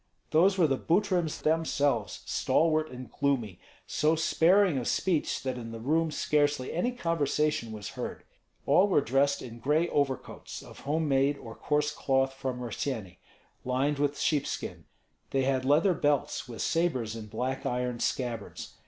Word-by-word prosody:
Those 190 Hz, +5 st, +4 dB
were 175 Hz, -, +5 dB
the 135 Hz, -3 st, +1 dB
Butryms 175 Hz, -3 st, 0 dB
themselves, 145 Hz, -8 st, 0 dB
stalwart 155 Hz, -1 st, +2 dB
and 125 Hz, 0 st, -9 dB
gloomy; 120 Hz, -10 st, -1 dB, 0.3 s
so 155 Hz, +2 st, +2 dB
sparing 170 Hz, 0 st, +3 dB
of 120 Hz, -, -4 dB
speech 170 Hz, -5 st, 0 dB
that 130 Hz, -2 st, -2 dB
in 115 Hz, -1 st, -7 dB
the 115 Hz, -, -7 dB
room 160 Hz, +7 st, +1 dB
scarcely 145 Hz, -3 st, 0 dB
any 180 Hz, +9 st, 0 dB
conversation 150 Hz, -, 0 dB
was 105 Hz, -2 st, -6 dB
heard. -, -, -6 dB, 0.4 s
All 180 Hz, +8 st, +5 dB
were 185 Hz, -, +3 dB
dressed 140 Hz, +2 st, +1 dB
in 120 Hz, -1 st, -9 dB
gray 150 Hz, +7 st, +2 dB
overcoats 140 Hz, -2 st, -2 dB
of -, -, -13 dB
home 155 Hz, +3 st, -1 dB
made 140 Hz, +1 st, +2 dB
or 115 Hz, -4 st, -9 dB
coarse 150 Hz, +3 st, 0 dB
cloth 135 Hz, -2 st, +1 dB
from 130 Hz, -2 st, -4 dB
Rossyeni, 115 Hz, -5 st, -4 dB, 0.4 s
lined 135 Hz, +3 st, 0 dB
with 145 Hz, 0 st, 0 dB
sheepskin; 150 Hz, -3 st, -2 dB, 0.4 s
they 135 Hz, -1 st, +1 dB
had 130 Hz, -1 st, 0 dB
leather 155 Hz, +7 st, +4 dB
belts, 145 Hz, -6 st, 0 dB
with 115 Hz, -, -4 dB
sabres 130 Hz, -10 st, 0 dB
in 110 Hz, -2 st, -7 dB
black 130 Hz, +5 st, -3 dB
iron 125 Hz, -1 st, -2 dB
scabbards. 120 Hz, -5 st, -3 dB
140 Hz, 155 wpm, -29 LUFS, 125-160 Hz, 0.4 s, were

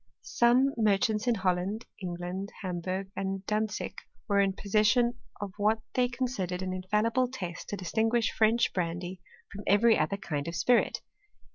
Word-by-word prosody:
Some 250 Hz, +3 st, +3 dB
merchants 215 Hz, +1 st, +2 dB
in 240 Hz, -, +3 dB
Holland, 190 Hz, +3 st, -1 dB, 0.2 s
England, 180 Hz, +2 st, -4 dB
Hamburg,. 185 Hz, +1 st, -3 dB
and 195 Hz, 0 st, -3 dB
Dantzic, 215 Hz, 0 st, -2 dB, 0.3 s
were 200 Hz, -2 st, +3 dB
in 195 Hz, -1 st, +3 dB
possession 215 Hz, +5 st, +2 dB, 0.2 s
of 200 Hz, -2 st, -5 dB
what 215 Hz, +2 st, +2 dB
they 250 Hz, -1 st, +2 dB
con 250 Hz, +1 st, -1 dB
sidered 185 Hz, -6 st, -3 dB
an 185 Hz, 0 st, -2 dB
infallible 210 Hz, +7 st, +1 dB
test 180 Hz, -9 st, -6 dB
to 205 Hz, -, -3 dB
distinguish 220 Hz, +5 st, +1 dB
French 225 Hz, +2 st, +3 dB
brandy 175 Hz, +1 st, -3 dB, 0.3 s
from 205 Hz, +1 st, -7 dB
every 220 Hz, +3 st, +5 dB
other 200 Hz, -, 0 dB
kind 150 Hz, -6 st, -4 dB
of 170 Hz, -, -4 dB
spirit. 235 Hz, +8 st, +2 dB
200 Hz, 150 wpm, -29 LUFS, 185-225 Hz, 0.3 s, every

